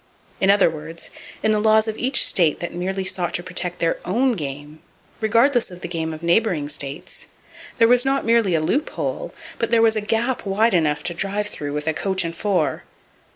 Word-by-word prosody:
In 195 - +2
other 200 +1 +6
words, 160 +1 -7 0.3
in 220 - +3
the 215 - +2
laws 220 +1 +4
of 220 - -2
each 260 +4 +2
state 170 -8 +2
that 170 - -5
merely 190 +2 -3
sought 175 -2 -2
to 175 - -2
protect 180 -1 -3
their 165 -1 0
own 245 +8 +1
game, 145 -3 -6 0.4
regardless 230 +3 +3
of 180 -1 -12
the - - -4
game 165 -2 -3
of 155 +1 -8
neighboring 170 -4 +1
states, 145 0 -6 0.5
there 230 - +5
was 245 +1 +4
not 270 0 0
merely 230 -6 +3
a 160 - +1
loop 275 - 0
hole, - - -4 0.3
but 230 - 0
there 230 0 +3
was 225 -1 +4
a 215 - 0
gap 230 +4 -1
wide 215 +3 +2
enough 155 -4 +1
to 175 - -2
drive 200 +4 -2
through 145 -8 -5
with 150 0 -3
a 160 - +2
coach 190 +3 0
and 165 0 -4
four. 200 0 0
190 Hz, 205 wpm, -22 LUFS, 165-225 Hz, 0.5 s, other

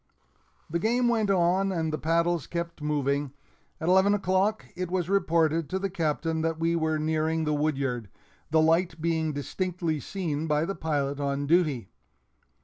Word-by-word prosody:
The 170 +2 -1
game 240 +5 +2
went 220 -3 +1
on, 190 +1 +2
and 160 -3 -1
the - - 0
paddles 170 0 +1
kept 170 -2 -4
moving. 145 -2 -1 0.5
At 160 - -3
eleven 190 +3 +5
o'clock 195 +2 +1
it 180 -1 -3
was 180 0 -1
reported 165 -5 +2
to 190 - -1
the 195 0 -2
Captain 160 -2 -1
that 165 0 -1
we 165 +1 +1
were 160 -1 +1
nearing 160 +1 0
the 150 -1 0
woodyard, 135 -7 -1 0.4
the 160 0 +4
light 165 +1 +2
being 160 -1 0
distinctly 165 +2 -2
seen 160 - -3
by 150 +1 +1
the 195 - -2
pilot 145 -5 -2
on 140 0 -1
duty. 150 - +2
165 Hz, 160 wpm, -27 LUFS, 150-180 Hz, 0.5 s, eleven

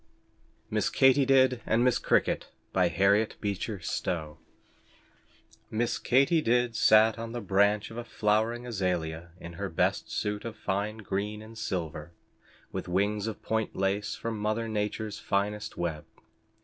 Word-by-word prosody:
MISS - - +1
KATY 135 0 +4
DID 130 -2 +4
AND 115 +2 +2
MISS 125 -1 +3
CRICKET - - +1 0.3
HARRIET 100 +4 +3
BEECHER 100 -1 -3
STOWE 80 -2 -3 1.3
Miss 115 +2 -1
Katy 140 +6 +3
Did 120 -2 +1
sat 110 +1 +5
on 115 0 -5
the 120 - -3
branch 100 +1 +2
of 115 - -9
a 120 - -3
flowering 110 +2 0
azalia 90 -7 -2
in 85 -1 -9
her 100 - -2
best 80 - 0
suit 105 0 -2
of 115 -1 -6
fine 100 +2 -2
green 105 0 -3
and 110 +1 -12
silver, 85 -7 -4 0.6
with - - -5
wings 100 +4 0
of 110 - -6
point 110 0 -1
lace 100 +2 -1
from 115 -2 -4
mother 110 +2 -1
nature's 105 0 -3
finest 105 +1 -2
web. 85 -3 -2
105 Hz, 140 wpm, -29 LUFS, 95-115 Hz, 1.3 s, sat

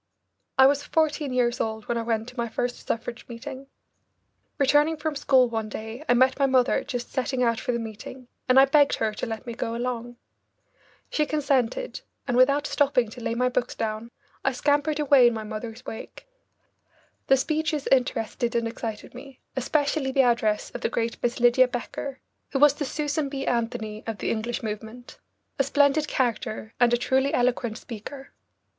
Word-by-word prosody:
I 265 - +8
was 285 +1 +4
fourteen 310 -3 0
years 245 -1 +1
old 220 -1 -3
when 240 - -1
I 230 - 0
went 225 -1 -1
to 250 - -15
my 235 -2 -2
first 245 +2 -3
suffrage 235 +1 -3
meeting. 265 +3 -8 0.9
Returning 295 +3 +3
from 305 0 -3
school 265 -3 +4
one 225 -2 -3
day, 220 +6 -7
I 245 - +5
met 260 +2 +3
my 275 - +4
mother 260 -1 +3
just 245 -1 -5
setting 260 -1 -1
out 230 -2 +2
for 245 - -2
the 235 - 0
meeting, 230 +3 -8 0.2
and 255 +1 +7
I 270 - +8
begged 285 +1 +4
her 220 -1 -1
to 210 - -4
let 225 +2 -5
me 235 - -5
go 230 0 -3
along. 240 0 -4 0.9
She 300 -1 +1
consented, 295 - 0 0.3
and 245 - 0
without 280 +3 +4
stopping 270 -7 +1
to 245 - -10
lay 230 - -2
my 250 +1 +2
books 250 -1 -1
down 220 +1 -3 0.3
I 270 - +1
scampered 290 +3 +1
away 280 -4 +6
in 235 - +1
my 220 - -4
mother's 220 +3 -7
wake. 220 - -9 1.0
The 270 - +5
speeches 305 +1 -1
interested 245 -2 +1
and 235 -1 +1
excited 225 -2 -6
me, 270 -2 -11 0.2
especially 285 +1 0
the 270 0 +4
address 230 -3 +1
of 245 - -7
the - - 0
great 230 0 -2
Miss 240 0 -1
Lydia 245 +2 +5
Becker, 250 +2 -5 0.3
who - - +2
was 290 +1 +6
the 290 0 -4
Susan 295 +1 -2
B. 275 -1 -4
Anthony 230 -3 -2
of 225 -2 -3
the - - -2
English 230 +2 -3
movement, 220 +3 -7 0.4
a - - +5
splendid 285 +2 +3
character 220 -4 -2
and 245 -1 +5
a 240 - +4
truly 265 +3 +1
eloquent 245 -2 0
speaker. 260 +5 -9
250 Hz, 180 wpm, -25 LUFS, 230-275 Hz, 1.0 s, I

